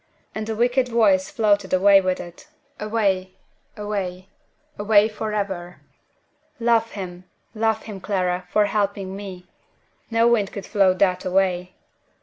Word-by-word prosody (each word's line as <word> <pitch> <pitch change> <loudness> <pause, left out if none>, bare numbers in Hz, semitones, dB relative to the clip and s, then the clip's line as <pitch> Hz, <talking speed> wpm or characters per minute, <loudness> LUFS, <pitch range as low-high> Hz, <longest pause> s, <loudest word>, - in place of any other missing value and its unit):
And 215 0 -4
the 220 - -2
wicked 245 +3 +2
Voice 205 -6 +3
floated 205 -3 +1
away 195 +1 +6
with 185 -1 -1
it 175 - -10 0.3
away, 195 -4 -1 0.4
away, 195 -3 -4 0.5
away 210 0 +4
forever! 200 -5 -4 0.8
'Love 230 -1 +2
him! 180 -2 -7 0.3
love 220 -1 0
him, 210 -3 -8
Clara, 180 -2 -1
for 210 +2 +3
helping 200 -2 -2
me!' 190 -3 -8 0.6
No 230 0 +3
wind 220 -5 +2
could 200 -3 -7
float 195 -3 +3
that 185 -1 +2
away! 185 -1 0
200 Hz, 130 wpm, -23 LUFS, 185-215 Hz, 0.8 s, away